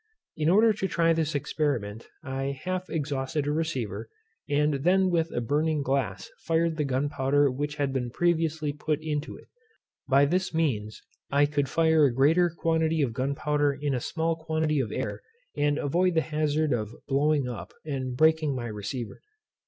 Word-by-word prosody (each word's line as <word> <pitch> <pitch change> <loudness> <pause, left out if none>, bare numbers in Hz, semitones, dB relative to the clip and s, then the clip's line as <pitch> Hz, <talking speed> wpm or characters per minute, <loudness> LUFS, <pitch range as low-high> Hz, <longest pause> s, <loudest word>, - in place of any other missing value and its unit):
In 155 0 +1
order 215 +4 +5
to 195 -2 -2
try 165 -2 +2
this 160 -2 -1
experiment 125 -7 -2 0.2
I 135 0 -3
half 185 0 -3
exhausted 145 -1 -2
a 145 - 0
receiver, 120 - -3 0.4
and 145 -1 +1
then 185 +2 +3
with 165 -1 +1
a 120 - -2
burning 150 +4 0
glass 130 -9 -1
fired 165 0 0
the 150 - +1
gunpowder 140 +1 +1
which 145 +3 -3
had 140 -2 -1
been 125 -2 -1
previously 160 0 0
put 150 +1 -2
into 155 -1 -3
it. - - -17 0.6
By 140 +1 +5
this 180 +3 -1
means 110 -10 -1 0.3
I 140 +1 +4
could 145 -1 -1
fire 160 -2 +4
a 135 - +3
greater 160 +7 +4
quantity 160 -1 +1
of 120 -4 -1
gunpowder 140 +2 0
in 145 -1 -1
a 125 - 0
small 165 +6 -1
quantity 160 -2 -1
of 125 -5 -2
air, - - -3 0.3
and 145 0 +1
avoid 175 +5 +1
the 160 - +4
hazard 155 -1 0
of 110 -2 -3
blowing 145 0 +2
up, 120 -2 -6
and 130 -4 -3
breaking 155 -2 +3
my 120 -2 -4
receiver. 105 +3 -5
145 Hz, 170 wpm, -27 LUFS, 135-160 Hz, 0.6 s, order